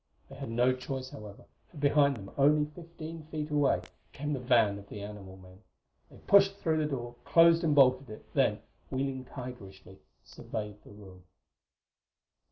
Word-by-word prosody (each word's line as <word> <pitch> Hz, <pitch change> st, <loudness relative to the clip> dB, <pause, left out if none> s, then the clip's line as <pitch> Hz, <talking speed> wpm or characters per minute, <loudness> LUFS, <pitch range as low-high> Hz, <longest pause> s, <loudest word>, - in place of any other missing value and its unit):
They 135 Hz, -, -11 dB
had 135 Hz, -2 st, -7 dB
no 120 Hz, +3 st, +2 dB
choice, 130 Hz, 0 st, -6 dB
however, 105 Hz, -2 st, -11 dB, 0.2 s
for 165 Hz, -, -16 dB
behind, 140 Hz, -7 st, +2 dB
only 150 Hz, +2 st, +4 dB
fifteen 165 Hz, 0 st, -9 dB
feet 155 Hz, -1 st, -5 dB
away, 145 Hz, -2 st, +2 dB, 0.3 s
came 150 Hz, +2 st, -3 dB
the 135 Hz, -, -2 dB
van 115 Hz, -5 st, +3 dB
of 100 Hz, 0 st, -15 dB
the 105 Hz, -, -7 dB
animal 100 Hz, -2 st, -9 dB
men. 95 Hz, +1 st, -16 dB, 0.5 s
They -, -, -16 dB
pushed 195 Hz, 0 st, +5 dB
through 160 Hz, -5 st, 0 dB
the 150 Hz, -1 st, 0 dB
door, 120 Hz, -4 st, -4 dB
closed 170 Hz, 0 st, +5 dB
and 155 Hz, -3 st, +2 dB
bolted 130 Hz, -1 st, +4 dB
it, 110 Hz, -, -10 dB
then, -, -, +1 dB, 0.3 s
wheeling 130 Hz, -1 st, -3 dB
tigerishly, 100 Hz, -8 st, -10 dB, 0.2 s
surveyed 105 Hz, -1 st, -7 dB
the -, -, -16 dB
room. 95 Hz, -3 st, -14 dB
130 Hz, 160 wpm, -30 LUFS, 105-150 Hz, 0.5 s, pushed